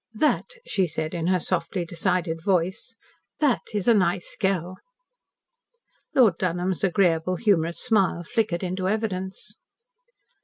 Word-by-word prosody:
"That," 300 Hz, +8 st, +2 dB, 0.2 s
she 190 Hz, -2 st, +1 dB
said 160 Hz, 0 st, -4 dB
in 170 Hz, -1 st, -2 dB
her 185 Hz, 0 st, +3 dB
softly 175 Hz, +1 st, -1 dB
decided 170 Hz, -1 st, -1 dB
voice, 190 Hz, +5 st, 0 dB, 0.4 s
"that 290 Hz, -6 st, +2 dB
is 205 Hz, -1 st, -2 dB
a 235 Hz, -, +7 dB
nice 185 Hz, -3 st, 0 dB
girl." 185 Hz, -1 st, -1 dB, 1.4 s
Lord 220 Hz, -10 st, +5 dB
Dunholm's 180 Hz, 0 st, -1 dB
agreeable, 180 Hz, -2 st, +2 dB
humorous 170 Hz, -5 st, +1 dB
smile 195 Hz, -5 st, +1 dB
flickered 200 Hz, -3 st, -1 dB
into 185 Hz, +1 st, -2 dB
evidence. 195 Hz, -3 st, -3 dB
185 Hz, 120 wpm, -25 LUFS, 170-200 Hz, 1.4 s, a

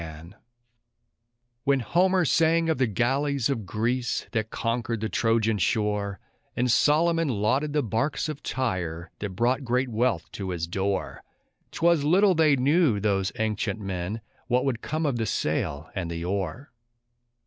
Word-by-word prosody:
When 140 Hz, -2 st, +2 dB
Homer 180 Hz, -, +2 dB
sang 165 Hz, +1 st, +3 dB
of 160 Hz, -, 0 dB
the 130 Hz, -, +3 dB
galleys 135 Hz, +4 st, 0 dB
of 110 Hz, -7 st, -3 dB
Greece 120 Hz, +5 st, -1 dB
that 110 Hz, -2 st, -1 dB
conquered 115 Hz, 0 st, -2 dB
the 110 Hz, +1 st, -2 dB
Trojan 115 Hz, -2 st, +1 dB
shore, 100 Hz, +1 st, 0 dB, 0.4 s
And 125 Hz, 0 st, +1 dB
Solomon 165 Hz, +5 st, +3 dB
lauded 130 Hz, +6 st, 0 dB
the 150 Hz, -1 st, +1 dB
barks 120 Hz, +7 st, -1 dB
of 150 Hz, -2 st, -5 dB
Tyre 90 Hz, -9 st, -3 dB
that 100 Hz, -3 st, -5 dB
brought 125 Hz, +5 st, +1 dB
great 125 Hz, +1 st, 0 dB
wealth 115 Hz, -5 st, 0 dB
to 95 Hz, -2 st, -5 dB
his 85 Hz, -2 st, -2 dB
door, 95 Hz, +3 st, -2 dB, 0.5 s
'Twas 170 Hz, -3 st, +2 dB
little 185 Hz, +6 st, +4 dB
they 155 Hz, -4 st, +4 dB
knew, 140 Hz, -, +3 dB
those 100 Hz, -2 st, 0 dB
ancient 110 Hz, 0 st, -1 dB
men, 95 Hz, +2 st, -4 dB, 0.3 s
what 125 Hz, +2 st, +1 dB
would 125 Hz, -4 st, -1 dB
come 155 Hz, +1 st, -2 dB
of 135 Hz, -5 st, 0 dB
the 115 Hz, -1 st, -1 dB
sail 70 Hz, -3 st, -2 dB
and 90 Hz, -3 st, -3 dB
the 85 Hz, 0 st, -4 dB
oar. 100 Hz, -, -3 dB
120 Hz, 150 wpm, -26 LUFS, 100-145 Hz, 0.5 s, little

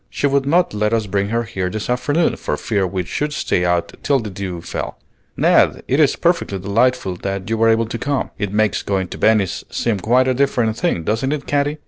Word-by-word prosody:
She -, -, -2 dB
would 140 Hz, -1 st, +2 dB
not 170 Hz, 0 st, +2 dB
let 105 Hz, +1 st, 0 dB
us 115 Hz, -2 st, +1 dB
bring 100 Hz, 0 st, -1 dB
her 115 Hz, +1 st, 0 dB
here 95 Hz, -4 st, -3 dB
this 110 Hz, +2 st, -4 dB
afternoon, 125 Hz, +7 st, +1 dB
for -, -, -3 dB
fear 100 Hz, -4 st, 0 dB
we 90 Hz, 0 st, -2 dB
should 150 Hz, -, -2 dB
stay 90 Hz, -, 0 dB
out 90 Hz, -1 st, 0 dB
till 140 Hz, -, +2 dB
the 110 Hz, -4 st, -6 dB
dew 95 Hz, -2 st, -5 dB
fell. -, -, -5 dB, 0.4 s
Ned, -, -, +3 dB
it -, -, +1 dB
is -, -, +4 dB
perfectly 100 Hz, -, 0 dB
delightful 100 Hz, 0 st, +1 dB
that 95 Hz, 0 st, -4 dB
you -, -, +2 dB
were 115 Hz, 0 st, +3 dB
able 115 Hz, 0 st, +3 dB
to 115 Hz, +1 st, -5 dB
come. 140 Hz, -1 st, -2 dB
It 105 Hz, -2 st, -2 dB
makes 110 Hz, 0 st, +1 dB
going 95 Hz, -3 st, -2 dB
to -, -, -8 dB
Venice 105 Hz, -5 st, +2 dB
seem 115 Hz, -4 st, -1 dB
quite 125 Hz, +6 st, +3 dB
a 130 Hz, -, +3 dB
different 120 Hz, -4 st, +1 dB
thing, 140 Hz, -, -1 dB
doesn't 115 Hz, -, 0 dB
it, 150 Hz, -2 st, -3 dB
Katy?" 145 Hz, +1 st, 0 dB
110 Hz, 220 wpm, -19 LUFS, 100-130 Hz, 0.4 s, is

